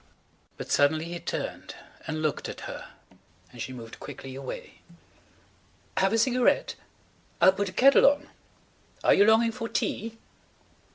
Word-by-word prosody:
But -, -, -7 dB
suddenly 155 Hz, +3 st, +3 dB
he 170 Hz, 0 st, -5 dB
turned 170 Hz, -, -5 dB, 0.3 s
and 155 Hz, 0 st, -3 dB
looked 155 Hz, -, -1 dB
at -, -, -8 dB
her -, -, -7 dB, 0.6 s
and 120 Hz, -, -10 dB
she 130 Hz, -, -4 dB
moved 115 Hz, -3 st, -10 dB
quickly 135 Hz, -1 st, -9 dB
away. 135 Hz, 0 st, -8 dB, 1.2 s
"Have 195 Hz, -, +3 dB
a 225 Hz, -, +2 dB
cigarette? 255 Hz, -, +2 dB, 0.7 s
I'll 190 Hz, -, +6 dB
put 200 Hz, +1 st, -2 dB
the 185 Hz, -, -6 dB
kettle 270 Hz, +7 st, +6 dB
on. 285 Hz, +1 st, +2 dB, 0.8 s
Are -, -, +6 dB
you 200 Hz, -, +5 dB
longing 225 Hz, +1 st, +4 dB
for 230 Hz, -1 st, -5 dB
tea?" 225 Hz, +1 st, -2 dB
195 Hz, 140 wpm, -27 LUFS, 155-230 Hz, 1.2 s, I'll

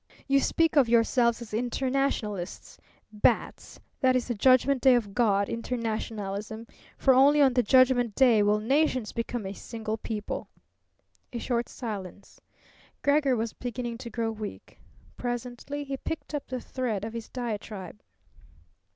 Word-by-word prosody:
You 275 Hz, 0 st, +4 dB
speak 325 Hz, +3 st, +1 dB
of 260 Hz, -5 st, +5 dB
yourselves 235 Hz, 0 st, +3 dB
as 225 Hz, -, -13 dB
internationalists. 240 Hz, -5 st, -2 dB, 0.3 s
Bats, 210 Hz, -, 0 dB, 0.2 s
that 255 Hz, -1 st, +3 dB
is 250 Hz, -, 0 dB
the -, -, +1 dB
judgment 255 Hz, +4 st, +4 dB
day 260 Hz, -2 st, +6 dB
of 210 Hz, -5 st, -1 dB
God 200 Hz, -3 st, +2 dB
internationalism! 220 Hz, -2 st, -4 dB, 0.3 s
For 265 Hz, -, +4 dB
only 280 Hz, +3 st, +5 dB
on 270 Hz, -3 st, +5 dB
the 245 Hz, -, +4 dB
judgment 245 Hz, -1 st, +4 dB
day 245 Hz, -5 st, +5 dB
will 205 Hz, +1 st, +3 dB
nations 260 Hz, -1 st, +1 dB
become 230 Hz, -2 st, -3 dB
a 190 Hz, -, -4 dB
single 220 Hz, +1 st, -5 dB
people." 210 Hz, -2 st, -5 dB, 0.8 s
A 240 Hz, -, -4 dB
short 235 Hz, 0 st, -1 dB
silence. 200 Hz, -5 st, -7 dB, 0.6 s
Gregor 285 Hz, -2 st, +3 dB
was 225 Hz, -1 st, -2 dB
beginning 240 Hz, -1 st, -5 dB
to 240 Hz, -, -7 dB
grow 225 Hz, 0 st, -2 dB
weak. 215 Hz, -2 st, -8 dB, 0.4 s
Presently 245 Hz, +4 st, -4 dB
he 275 Hz, -1 st, -4 dB
picked 320 Hz, +2 st, -6 dB
up 295 Hz, -, -3 dB
the 255 Hz, 0 st, -4 dB
thread 235 Hz, -6 st, -3 dB
of 225 Hz, -, -6 dB
his 230 Hz, -1 st, -6 dB
diatribe. 210 Hz, -, -6 dB
235 Hz, 140 wpm, -28 LUFS, 215-260 Hz, 0.8 s, day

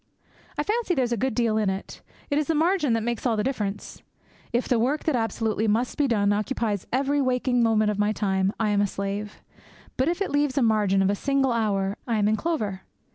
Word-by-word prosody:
I 295 Hz, -, 0 dB
fancy 425 Hz, -1 st, 0 dB
there's 250 Hz, -4 st, 0 dB
a -, -, +2 dB
good 250 Hz, +1 st, -1 dB
deal 230 Hz, -2 st, +1 dB
in 210 Hz, -3 st, +1 dB
it. 190 Hz, +1 st, -6 dB, 0.3 s
It 285 Hz, -, +2 dB
is 300 Hz, -, -1 dB
the 325 Hz, -, +1 dB
margin 320 Hz, -4 st, +2 dB
that 225 Hz, -1 st, 0 dB
makes 235 Hz, -1 st, -2 dB
all 235 Hz, -4 st, +1 dB
the 210 Hz, -, 0 dB
difference. 210 Hz, -7 st, -4 dB, 0.5 s
If 240 Hz, +1 st, 0 dB
the 245 Hz, -3 st, +2 dB
work 275 Hz, +6 st, 0 dB
that 310 Hz, -, +1 dB
absolutely 225 Hz, -1 st, -1 dB
must 230 Hz, +4 st, 0 dB
be 290 Hz, -2 st, +1 dB
done 205 Hz, -4 st, +2 dB
occupies 210 Hz, -2 st, -2 dB
every 280 Hz, +3 st, +1 dB
waking 250 Hz, -1 st, +1 dB
moment 215 Hz, -2 st, +3 dB
of 205 Hz, -, -4 dB
my 210 Hz, +1 st, +2 dB
time, 195 Hz, -2 st, 0 dB
I 220 Hz, -2 st, +1 dB
am 205 Hz, 0 st, +2 dB
a 205 Hz, -, +2 dB
slave; 200 Hz, +2 st, -5 dB, 0.5 s
but 260 Hz, -, +1 dB
if 350 Hz, +1 st, -2 dB
it 395 Hz, -, -2 dB
leaves 290 Hz, -1 st, +1 dB
a 270 Hz, -, +4 dB
margin 205 Hz, -4 st, +2 dB
of 195 Hz, -, +2 dB
a -, -, 0 dB
single 275 Hz, +3 st, +1 dB
hour, 205 Hz, -3 st, 0 dB
I 230 Hz, -2 st, +1 dB
am 205 Hz, -1 st, +2 dB
in 215 Hz, -, +3 dB
clover. 215 Hz, -, -2 dB
225 Hz, 230 wpm, -25 LUFS, 205-270 Hz, 0.5 s, a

